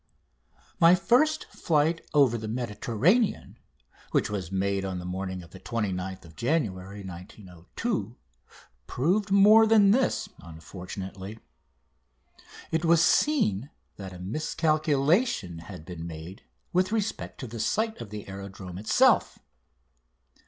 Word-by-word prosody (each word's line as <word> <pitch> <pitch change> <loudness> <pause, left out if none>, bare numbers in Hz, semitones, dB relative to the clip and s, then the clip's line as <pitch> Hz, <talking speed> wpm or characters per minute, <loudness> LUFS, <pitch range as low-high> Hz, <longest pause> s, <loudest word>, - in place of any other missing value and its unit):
11] - - -31
My 170 0 +7
first 255 - +2
flight 160 +1 +1
over 140 -6 +4
the 110 -1 -4
Mediterranean, 120 - 0 0.5
which - - 0
was 95 -4 -4
made 95 0 0
on 95 -1 -3
the 90 - -6
morning 95 0 -4
of 85 - -16
29th 95 -5 -4
January 105 - -2
1902, 95 - -6 0.7
proved 190 +10 0
more 210 +3 +7
than 210 -3 +6
this, 255 +4 +1
unfortunately. 95 +4 -8 1.3
It 160 +1 0
was 170 0 +5
seen 145 - +2 0.3
that 95 -2 -7
a 90 - -10
miscalculation 155 - 0
had 85 -1 -10
been 85 -2 -7
made 85 +3 -9 0.3
with 185 +2 +2
respect 220 -1 -3
to - - -4
the 115 -1 -8
site 220 - -1
of 115 - -8
the 105 0 -8
aerodrome 95 -2 -8
itself. 110 - +3
110 Hz, 115 wpm, -27 LUFS, -, 1.3 s, My